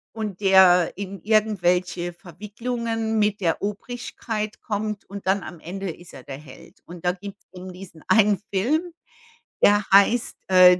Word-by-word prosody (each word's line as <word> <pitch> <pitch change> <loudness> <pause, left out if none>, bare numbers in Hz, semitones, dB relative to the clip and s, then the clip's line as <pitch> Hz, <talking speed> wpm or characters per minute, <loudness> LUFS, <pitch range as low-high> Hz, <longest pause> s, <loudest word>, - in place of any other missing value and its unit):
Und 210 -3 -5
der 185 -3 +6
in 195 -2 -6
irgendwelche 180 -5 +1
Verwicklungen 225 +5 -3
mit 210 -1 +1
der 170 -4 0
Obrigkeit 215 0 -5
kommt 210 -1 -3
und 200 -1 -9
dann 195 0 +2
am 175 - -9
Ende 185 +2 -5
ist 175 +2 -14
er 130 - -11
der 135 -1 -8
Held. 140 -3 -15
Und 175 0 -11
da 180 - +4
gibt's 200 +2 -10
dann 185 0 -9
diesen 180 -3 -12
einen 210 -3 +4
Film, 310 - 0 0.7
der 205 0 +5
heißt, 210 +4 +4
äh, 180 -1 +8
195 Hz, 150 wpm, -24 LUFS, 180-215 Hz, 0.7 s, äh